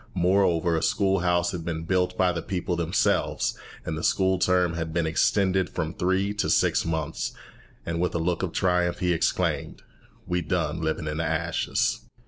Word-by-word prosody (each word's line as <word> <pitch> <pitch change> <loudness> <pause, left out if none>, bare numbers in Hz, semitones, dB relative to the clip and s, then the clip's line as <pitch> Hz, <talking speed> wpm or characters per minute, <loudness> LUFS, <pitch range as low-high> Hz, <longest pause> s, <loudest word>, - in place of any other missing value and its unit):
Moreover, 90 -2 +2
a 80 - 0
school 95 +1 +2
house 85 0 +1
had 85 -2 -5
been 80 -1 -3
built 90 +1 0
by 90 -1 +3
the 85 -1 -3
people 90 0 -2
themselves, 85 +2 0 0.3
and 80 - -3
the 80 - -4
school 95 -1 +2
term 90 -2 +2
had 80 -1 -3
been 85 -1 +1
extended 95 +3 +2
from 80 -2 -3
three 95 +3 0
to 105 - -1
six - - +3
months; 80 -1 -3 0.5
and, 85 0 -2
with 90 -1 -1
a - - +2
look 85 +1 -1
of 95 -3 -2
triumph, 90 -1 +1
he 90 -1 +1
exclaimed, 80 - -1 0.4
"We's 90 -2 -1
done 80 -3 -1
libin' 80 0 -2
in 75 0 -3
de 85 - -1
ashes." 85 +1 0
85 Hz, 180 wpm, -26 LUFS, 80-90 Hz, 0.5 s, by